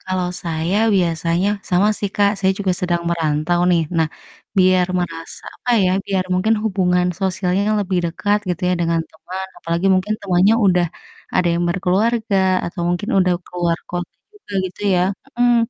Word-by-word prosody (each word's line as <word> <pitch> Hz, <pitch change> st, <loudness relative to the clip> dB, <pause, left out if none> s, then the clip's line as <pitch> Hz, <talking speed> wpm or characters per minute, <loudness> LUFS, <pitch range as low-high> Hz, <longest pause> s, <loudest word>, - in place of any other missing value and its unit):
kalau 185 Hz, -1 st, -1 dB
saya 165 Hz, +2 st, -1 dB, 0.2 s
biasanya, 170 Hz, 0 st, +1 dB, 0.2 s
sama 185 Hz, +4 st, +3 dB
sih 200 Hz, -2 st, -2 dB
Kak, 205 Hz, -1 st, +4 dB
saya 190 Hz, -1 st, +2 dB
juga 195 Hz, -2 st, 0 dB
sedang 175 Hz, -1 st, 0 dB
merantau 160 Hz, +1 st, 0 dB
nih. 170 Hz, -2 st, +3 dB
Nah, 160 Hz, -1 st, +2 dB, 0.5 s
biar 185 Hz, -1 st, +4 dB
merasa, 165 Hz, -2 st, -5 dB
apa 245 Hz, -, -4 dB
ya, 180 Hz, -, +3 dB, 0.2 s
biar 190 Hz, -2 st, 0 dB
mungkin 210 Hz, +5 st, +2 dB
hubungan 180 Hz, -4 st, +1 dB
sosialnya 190 Hz, 0 st, 0 dB, 0.2 s
lebih 185 Hz, -2 st, -1 dB
dekat 205 Hz, +5 st, 0 dB
gitu 180 Hz, 0 st, -2 dB
ya, 180 Hz, -, +2 dB
dengan 165 Hz, -1 st, +1 dB
teman 180 Hz, +4 st, -7 dB
apalagi 170 Hz, +2 st, -1 dB
mungkin 190 Hz, +3 st, 0 dB
temannya 195 Hz, +2 st, +3 dB
udah, 180 Hz, -2 st, +3 dB, 0.5 s
ada 180 Hz, -, +2 dB
yang 170 Hz, +1 st, 0 dB
berkeluarga 200 Hz, +4 st, +1 dB, 0.3 s
atau 170 Hz, -, -6 dB
mungkin 175 Hz, +4 st, -2 dB
udah 185 Hz, -1 st, +3 dB
keluar 175 Hz, -2 st, -1 dB
kota 175 Hz, -1 st, -4 dB, 0.2 s
juga 415 Hz, -, -15 dB, 0.2 s
gitu 185 Hz, -, -17 dB
ya 180 Hz, -, +3 dB, 0.3 s
mhm. 245 Hz, 0 st, +4 dB
180 Hz, 160 wpm, -19 LUFS, 175-195 Hz, 0.5 s, Kak